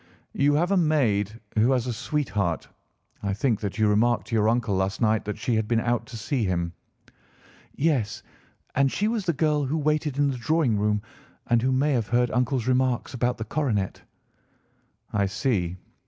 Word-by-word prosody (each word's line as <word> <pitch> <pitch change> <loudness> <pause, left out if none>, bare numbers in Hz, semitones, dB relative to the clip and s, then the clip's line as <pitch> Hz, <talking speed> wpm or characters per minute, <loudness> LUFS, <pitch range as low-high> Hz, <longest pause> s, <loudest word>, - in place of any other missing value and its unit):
"You 145 +1 +3
have 175 +5 +1
a 200 - +4
maid 115 - +1 0.2
who 120 +5 +4
has 125 -2 0
a 125 - -2
sweetheart? 110 - -2 0.5
I 100 -1 -1
think 110 0 +1
that 100 -1 -4
you 110 -1 +3
remarked 115 +4 +2
to 115 - -1
your 110 0 +3
uncle 115 -3 +1
last 95 0 -1
night 110 -1 +2
that 105 0 -4
she 110 +3 -1
had 110 -1 +1
been 115 0 +2
out 120 -1 -1
to 115 - -8
see 115 +3 -1
him?" 85 -3 -1 1.0
"Yes, 135 -9 0 0.5
and 135 0 +2
she 210 - 0
was 220 -4 -2
the 170 - +3
girl 150 -1 +1
who 145 +5 -1
waited 150 -2 0
in 145 -1 +2
the 130 - -4
drawing 135 -5 +1
room, 105 0 +1 0.4
and 120 -1 +2
who 130 +2 +1
may 140 +3 +2
have 115 -5 0
heard 120 0 +2
uncle's 125 -1 0
remarks 130 -1 +1
about 125 0 0
the 110 - -5
coronet." 110 -8 -1 1.1
"I 100 -1 +2
see. 95 -5 -1
120 Hz, 185 wpm, -25 LUFS, 105-140 Hz, 1.1 s, a